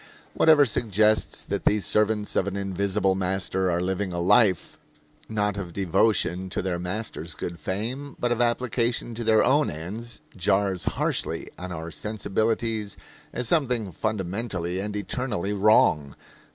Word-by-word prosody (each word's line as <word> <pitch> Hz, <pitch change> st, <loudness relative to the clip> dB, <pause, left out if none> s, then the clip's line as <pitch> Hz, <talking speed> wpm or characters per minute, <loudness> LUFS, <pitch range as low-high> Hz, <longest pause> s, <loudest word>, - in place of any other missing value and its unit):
Whatever 155 Hz, -3 st, +6 dB
suggests 110 Hz, -2 st, +2 dB
that -, -, -3 dB
these 105 Hz, -1 st, +2 dB
servants 105 Hz, -1 st, +1 dB
of 95 Hz, -, +1 dB
an 100 Hz, -, -3 dB
invisible 100 Hz, 0 st, 0 dB
master 95 Hz, 0 st, 0 dB
are 85 Hz, 0 st, +1 dB
living 95 Hz, +1 st, -2 dB
a 85 Hz, -, -3 dB
life, 95 Hz, +1 st, +3 dB, 0.5 s
not 105 Hz, -2 st, -1 dB
of 90 Hz, -4 st, -5 dB
devotion 95 Hz, 0 st, +1 dB
to 90 Hz, -, -2 dB
their 90 Hz, -2 st, -2 dB
master's 100 Hz, +6 st, -4 dB
good 85 Hz, -1 st, -6 dB
fame, 120 Hz, -, -4 dB
but 120 Hz, -, 0 dB
of 120 Hz, 0 st, +1 dB
application 120 Hz, 0 st, 0 dB
to 115 Hz, +1 st, -4 dB
their 110 Hz, -1 st, +4 dB
own 145 Hz, +3 st, +3 dB
ends, 100 Hz, +10 st, -5 dB, 0.2 s
jars 95 Hz, -1 st, +1 dB
harshly -, -, -1 dB
on 90 Hz, 0 st, -6 dB
our 85 Hz, -1 st, -6 dB
sensibilities 110 Hz, +2 st, -2 dB, 0.3 s
as 125 Hz, -, -2 dB
something 125 Hz, -, +1 dB
fundamentally 95 Hz, -2 st, -2 dB
and 105 Hz, +1 st, -4 dB
eternally 105 Hz, -1 st, -2 dB
wrong. 95 Hz, -9 st, +3 dB
100 Hz, 140 wpm, -25 LUFS, 95-115 Hz, 0.5 s, Whatever